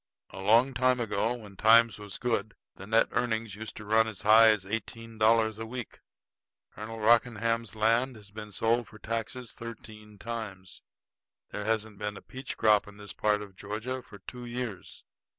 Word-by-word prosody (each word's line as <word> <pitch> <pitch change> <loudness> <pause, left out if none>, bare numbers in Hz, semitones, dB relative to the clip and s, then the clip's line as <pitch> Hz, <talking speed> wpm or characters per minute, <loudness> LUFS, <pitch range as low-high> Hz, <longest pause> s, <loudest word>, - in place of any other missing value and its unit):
A 95 - -8
long 115 +7 +4
time 130 0 +2
ago, 115 +1 0
when 105 -5 -12
times 115 +2 +5
was 105 -3 -7
good, 115 -3 -1 0.2
the 95 - -10
net 115 +1 +3
earnings 110 -3 -1
used 110 +1 -7
to 110 - -8
run 110 +2 +3
as 105 -4 -7
high 110 +2 +8
as 105 -4 +3
eighteen 115 +2 -5
dollars 110 0 +3
a 115 - -4
week. 125 0 -7 0.7
Colonel 110 +1 -7
Rockingham's 115 -1 +2
land 115 +4 +2
has 105 -2 -14
been 105 0 -8
sold 115 +3 +1
for 110 - -14
taxes 115 +2 -4
thirteen 110 -3 -10
times. 105 -5 -7 0.7
There 105 - -5
hasn't 110 -2 -1
been 105 -1 -4
a - - -10
peach 130 0 -7
crop 105 -2 +4
in 105 0 -13
this 105 0 -8
part 105 -1 +1
of 100 -2 -13
Georgia 110 +7 -5
for 105 - -14
two 125 +3 -9
years. 120 -5 -6
110 Hz, 175 wpm, -29 LUFS, 105-115 Hz, 0.7 s, high